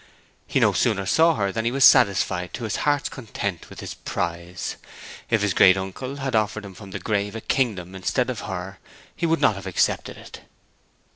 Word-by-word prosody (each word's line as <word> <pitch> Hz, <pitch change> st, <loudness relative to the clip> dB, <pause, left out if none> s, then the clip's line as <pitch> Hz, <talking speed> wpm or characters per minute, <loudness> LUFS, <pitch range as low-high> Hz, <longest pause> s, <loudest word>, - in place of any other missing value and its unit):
He -, -, +1 dB
no -, -, +4 dB
sooner 100 Hz, -, +1 dB
saw 165 Hz, -, +4 dB
her 100 Hz, -4 st, 0 dB
than 115 Hz, +1 st, -2 dB
he 115 Hz, -, 0 dB
was 135 Hz, 0 st, +4 dB
satisfied 90 Hz, -2 st, +4 dB
to 120 Hz, -, -7 dB
his 110 Hz, -2 st, -2 dB
heart's 145 Hz, -1 st, +1 dB
content 100 Hz, -, -5 dB
with -, -, -10 dB
his -, -, -6 dB
prize. 85 Hz, +2 st, -4 dB, 0.5 s
If 115 Hz, -3 st, +2 dB
his 105 Hz, -3 st, +1 dB
great 95 Hz, +1 st, +6 dB
uncle 95 Hz, +8 st, -5 dB
had 135 Hz, -3 st, -3 dB
offered 110 Hz, -1 st, 0 dB
him 100 Hz, -, -9 dB
from 100 Hz, +1 st, -12 dB
the -, -, -5 dB
grave 105 Hz, -1 st, -2 dB
a 115 Hz, -, -5 dB
kingdom 100 Hz, -10 st, -1 dB
instead 120 Hz, +7 st, -1 dB
of 120 Hz, -, -6 dB
her, 95 Hz, 0 st, -6 dB, 0.4 s
he 170 Hz, -, -1 dB
would 165 Hz, 0 st, +2 dB
not -, -, +5 dB
have 95 Hz, -1 st, -8 dB
accepted 95 Hz, -, 0 dB
it. -, -, -12 dB
100 Hz, 200 wpm, -24 LUFS, 95-125 Hz, 0.5 s, great